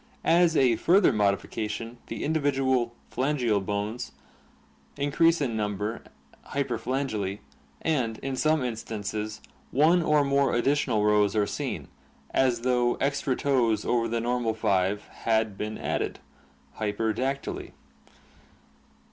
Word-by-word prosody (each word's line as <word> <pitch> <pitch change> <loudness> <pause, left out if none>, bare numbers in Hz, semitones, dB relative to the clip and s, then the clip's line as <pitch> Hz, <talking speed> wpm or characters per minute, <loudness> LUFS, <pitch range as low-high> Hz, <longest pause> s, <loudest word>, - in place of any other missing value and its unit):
As 170 -1 +4
a 125 -4 +4
further 180 - +4
modification 105 +3 -1
the - - -5
individual 135 -5 +1 0.2
phalangeal 125 -7 +1
bones 105 +4 -3 0.8
increase 165 +4 +3
in 130 -6 -1
number 105 +1 -2 0.5
(hyperphalangy) 120 -6 -1 0.5
and, 125 -9 0
in. 135 0 -2
some 155 +1 +2
instances, 110 -2 -4 0.3
one 160 +6 +4
or 150 -3 +3
more 140 0 +2
additional 125 -4 +2
rows 105 -1 +3
are 105 -1 +3
seen, - - -4 0.4
as 125 -3 +2
though 125 -1 +2
extra 140 -1 0
toes 120 -7 +1
over 115 -1 +1
the 115 0 -1
normal 120 -1 0
five 100 -1 +1
had 110 -2 -1
been 105 +2 -4
added - - -2 0.6
(hyper 110 +1 -1
dactyly). 135 +4 -3
120 Hz, 115 wpm, -27 LUFS, 110-140 Hz, 0.8 s, As